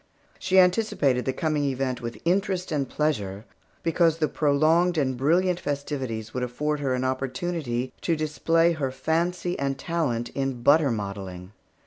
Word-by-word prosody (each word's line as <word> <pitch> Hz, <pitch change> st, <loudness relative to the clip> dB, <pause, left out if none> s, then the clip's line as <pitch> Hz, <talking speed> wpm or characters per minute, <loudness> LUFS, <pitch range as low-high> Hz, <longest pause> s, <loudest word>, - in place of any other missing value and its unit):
She 190 Hz, 0 st, +1 dB
anticipated 180 Hz, -, +3 dB
the 130 Hz, -, +1 dB
coming 150 Hz, +2 st, -1 dB
event 130 Hz, -2 st, -1 dB
with 115 Hz, -2 st, -5 dB
interest 185 Hz, 0 st, 0 dB
and 140 Hz, -3 st, -1 dB
pleasure, 105 Hz, -10 st, -2 dB, 0.4 s
because 165 Hz, -1 st, +2 dB
the 155 Hz, -2 st, +1 dB
prolonged 155 Hz, +5 st, +2 dB
and 130 Hz, -3 st, +1 dB
brilliant 175 Hz, +7 st, +2 dB
festivities 135 Hz, -7 st, -4 dB
would 125 Hz, -, -2 dB
afford 150 Hz, +5 st, -2 dB
her 135 Hz, -3 st, 0 dB
an 125 Hz, -, -2 dB
opportunity 130 Hz, -1 st, -2 dB
to 165 Hz, -, +1 dB
display 165 Hz, +2 st, +2 dB
her 150 Hz, -5 st, -1 dB
fancy 170 Hz, +6 st, -1 dB
and 135 Hz, -1 st, -1 dB
talent 135 Hz, -7 st, -1 dB
in 135 Hz, -3 st, -3 dB
butter 145 Hz, +1 st, +5 dB
modelling. 100 Hz, -4 st, -5 dB
145 Hz, 145 wpm, -25 LUFS, 125-165 Hz, 0.4 s, butter